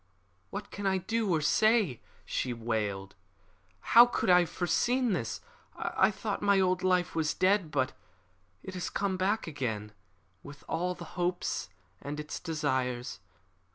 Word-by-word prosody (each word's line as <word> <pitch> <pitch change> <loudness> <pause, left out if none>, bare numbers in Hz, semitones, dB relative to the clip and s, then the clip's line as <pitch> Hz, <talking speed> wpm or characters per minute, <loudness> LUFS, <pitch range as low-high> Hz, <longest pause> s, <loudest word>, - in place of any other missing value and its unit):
"What 200 +1 -6
can 205 -1 -3
I 190 0 +2
do 215 +2 -1
or 160 -2 +2
say?" 210 - +3 0.2
she 125 - -2
wailed. 105 -4 -3 0.8
"How 235 +1 +10
could 215 - +1
I 180 - +8
have 175 - 0
foreseen 240 +6 +1
this? 135 -10 -3 0.3
I 190 - +2
thought 210 0 -3
my 200 -1 +4
old 185 -1 +2
life 180 -1 +2
was 160 -2 0
dead. 185 -2 +2
But 130 -3 0 0.7
it 190 - -7
has 180 -1 -3
come 195 -2 -1
back 200 +4 0
again, 115 -9 -3 0.5
with 145 0 -12
all 180 +2 -1
its - - -9
hopes 175 - -2 0.3
and 145 +1 -5
its 150 0 -5
desires. 130 -6 -2
180 Hz, 150 wpm, -30 LUFS, 135-195 Hz, 0.8 s, How